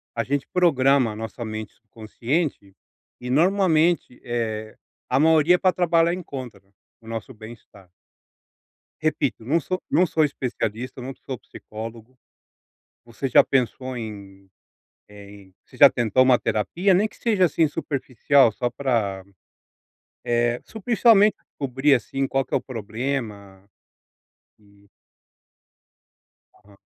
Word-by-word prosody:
a 115 - 0
gente 140 +2 -2
programa 140 -8 +3
a - - -8
nossa 115 +2 -6
mente 110 -1 -7 0.2
consciente, 115 - -3 0.5
e 125 - -6
normalmente, 170 -2 +2
eh, 110 -2 -4 0.3
a 130 - +1
maioria 160 +3 +4
pra 185 - +3
trabalhar 170 -1 +2
em 180 - -4
contra, 125 - -8 0.4
o 115 - -17
nosso 115 +2 -6
bem 110 0 -10
estar. 100 -5 -19 1.1
Repito, - - -1
não 150 +9 +1
sou 185 +4 -4
não 180 - +4
sou 160 -1 +1
especialista, 125 -4 -3
não 130 +2 -6
sou 130 - -5
psicólogo. 115 +3 -10 0.9
Você 120 +3 -5
já 125 - +6
pensou 130 0 -1
em, 100 -4 -9 0.6
eh, 100 -1 -13
em 100 -2 -16
você - - -18
já 140 - +8
tentou 120 +1 +2
uma 130 -1 +4
terapia? 175 - 0
Nem 205 +4 +2
que - - -20
seja 210 -6 +1
assim 165 -1 +2
superficial 140 -4 +1
só 120 +3 -2
pra, 115 -8 -2 1.0
eh, 120 0 0
se - - -16
o 220 - -7
pensamento 220 -2 +4
descobrir, 135 +1 0
assim, 135 +3 -2
qual 135 0 -1
que - - -29
é - - +4
o - - 0
problema. 110 -4 -5 0.9
Hum. 100 -1 -25 1.7
Aham. 100 -1 -22
125 Hz, 135 wpm, -23 LUFS, 110-150 Hz, 1.7 s, já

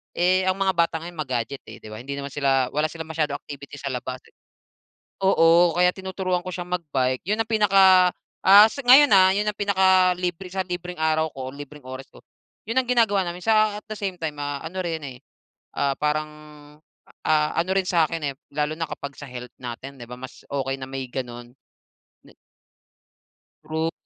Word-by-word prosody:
eh, 185 +1 +3
ang 185 - 0
mga 190 -1 +2
bata 170 -1 +2
ngayon 175 0 -9
ma-gadget, 130 -1 -3
eh, - - -10
di - - -16
ba? 110 - -8
Hindi 140 +3 -6
naman 140 0 -6
sila 135 -3 +1
wala 150 +2 +1
silang 165 -1 -7
masyadong 150 -3 -1
activity 140 0 -10
sa 140 - -4
labas, 125 +1 -4
eh. - - -24 0.9
Oo, 170 -2 +5
kaya 180 0 +4
tinuturuan 190 -1 -2
ko - - -4
siyang 175 0 -6
mag-bike. 135 -7 -1
Yun 210 - +1
ang 220 - -26
pinaka, 195 -4 +5 0.3
ah, 200 +2 +9
sa 280 - -6
ngayon, 275 +4 +8
ah, 190 -1 +7
yun 205 +1 0
ang - - -3
pinakalibre 185 -2 +2
sa 190 -1 -1
libreng 180 0 -6
araw 160 0 +1
ko, 130 -1 -6
libreng 145 0 -11
oras 130 +1 -8
ko, - - -17 0.4
yun 230 +4 -3
ang 250 - -12
ginagawa 225 -5 +3
namin 175 +1 -6
sa 215 -1 +3
at - - -56
the - - -3
same 195 -3 -3
time, 160 -3 -4
ah, 145 -1 -4
ano 180 +3 -5
rin, 165 -2 -3
eh, 130 -3 -7 0.6
ah, 140 - +1
parang, 155 +1 -1 1.0
ah, 150 -1 +2
ano 170 +3 0
rin 190 - +1
sa'kin, 165 -2 +1
eh, - - -29 0.2
lalo 150 +1 -1
na 165 -1 -3
kapag 140 0 -6
sa 145 - -8
health 125 -1 -9
natin, 130 +3 -8
di 120 - -9
ba? 125 - -7
Mas 130 0 -10
okey 135 -1 -2
na 130 - -5
may 135 -1 -4
gano'n 120 -1 -7 0.7
na - - -17 1.4
Rout 160 +1 -1
165 Hz, 190 wpm, -24 LUFS, 140-185 Hz, 1.4 s, ah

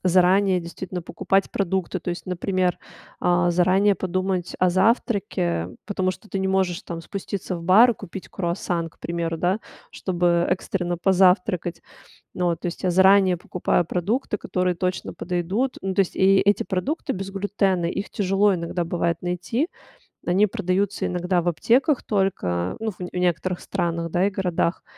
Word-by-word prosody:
заранее 185 +1 +4
действительно 180 +2 -6
покупать 195 +3 0
продукты. 190 -1 -1
То 175 - -4
есть, 175 - -6
например, 185 0 0 0.4
а, 175 0 +3
заранее 185 +4 +3
подумать 185 0 -2
о 185 - +4
завтраке. 185 - +1 0.2
Потому 185 -3 0
что 215 +3 -11
ты 195 - -3
не 190 - 0
можешь 190 -1 0
там 170 -1 -6
спуститься 190 +1 -5
в 170 - -8
бар, 225 +7 +6
купить 195 -2 -9
круассан, 170 -2 -2
к - - -29
примеру, 170 -1 -3
да, 185 +6 +1 0.3
чтобы 175 -2 +1
экстренно 175 -1 -1
позавтракать. 180 -1 +2 0.5
Ну 180 - -1
вот, 170 -1 0
то - - -2
есть, 170 - -6
я 185 - +2
заранее 190 0 +5
покупаю 175 0 0
продукты, 205 - -1
которые 180 -1 -1
точно 180 +1 -2
подойдут. 185 +9 -2
Ну, 190 0 -2
то 195 - -2
есть, 190 - +1
и 195 +1 +5
эти 205 +1 +2
продукты 255 - -2
без 195 +1 -4
глютена, 195 -2 0
их 195 +4 -3
тяжело 195 0 +2
иногда 170 0 -3
бывать 170 -1 -1
найти. 180 - -1 0.6
Они 185 +4 +4
продаются 195 +1 -1
иногда 180 0 0
в 175 - -5
аптеках 250 - +2
только, 90 - -1
ну 225 - -1
ф 205 - -8
в 180 - -5
некоторых 180 0 0
странах, 170 -1 -2
да, 180 +2 +2
и - - +1
городах. 180 -3 -1
185 Hz, 160 wpm, -23 LUFS, 175-195 Hz, 0.6 s, бар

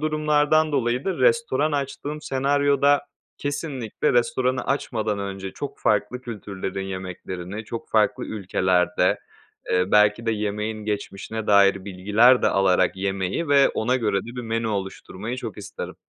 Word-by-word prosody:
durumlardan 155 0 +2
dolayı 125 -1 0
da 190 - -2
restoran 465 - +2
açtığım 145 +1 -3
senaryoda 140 +1 +2 0.3
kesinlikle 145 -5 -2
restoranı 130 +1 +1
açmadan 110 -6 -1
önce 95 -1 -5
çok 145 - -6
farklı 105 +4 0
kültürlerin 100 -4 -5
yemeklerini 95 +1 -6
çok 115 +2 -7
farklı 110 -1 +2
ülkelerde, 90 -3 +1 0.5
eee, 90 0 +3
belki 105 +2 +4
de 115 - +2
yemeğin 105 0 -3
geçmişine 105 +1 -4
dair 100 -1 +4
bilgiler 105 +7 +4
de - - +3
alarak 95 -2 +2
yemeyi 95 - -2
ve 140 -1 +5
ona 120 +4 0
göre 105 -6 +1
de - - -13
bir 125 - -4
menü 115 -1 -2
oluşturmayı 100 +3 -4
çok 115 -5 -6
isterim. - - -7
110 Hz, 135 wpm, -24 LUFS, 100-135 Hz, 0.5 s, ve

